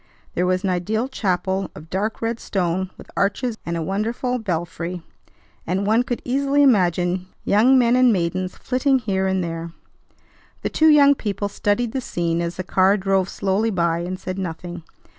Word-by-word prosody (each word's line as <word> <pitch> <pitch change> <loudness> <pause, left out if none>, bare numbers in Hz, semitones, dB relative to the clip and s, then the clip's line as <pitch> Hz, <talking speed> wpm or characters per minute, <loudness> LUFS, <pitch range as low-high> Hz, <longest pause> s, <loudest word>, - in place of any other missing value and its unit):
There 180 +1 0
was 185 +1 +1
an 190 - +1
ideal 215 +7 -1
chapel 190 -5 -1
of 155 +2 -12
dark 210 +4 -2
red 230 0 -1
stone 185 -1 -1
with - - -13
arches 215 +3 0
and 170 0 -1
a 165 - -2
wonderful 230 +7 -1
belfry, 175 -3 -4 0.6
and 190 +3 0
one 220 +3 +3
could 245 -1 -4
easily 280 +3 +2
imagine 180 - +2 0.2
young 235 +6 +5
men 240 -1 +4
and 255 -1 +5
maidens 185 -1 -1
flitting 265 +1 +1
here 195 -5 -1
and 190 -1 0
there. 165 0 -5 0.9
The - - 0
two 315 0 +4
young 285 -2 +7
people 205 -5 -3
studied 205 +4 0
the 265 - -2
scene 170 -6 -1
as 170 0 -3
the 185 - -4
car 190 +2 +3
drove 195 -1 +1
slowly 200 +3 0
by, 170 -4 +1
and 180 +2 -4
said 185 0 -5
nothing. 175 -1 -5
195 Hz, 175 wpm, -22 LUFS, 180-230 Hz, 0.9 s, young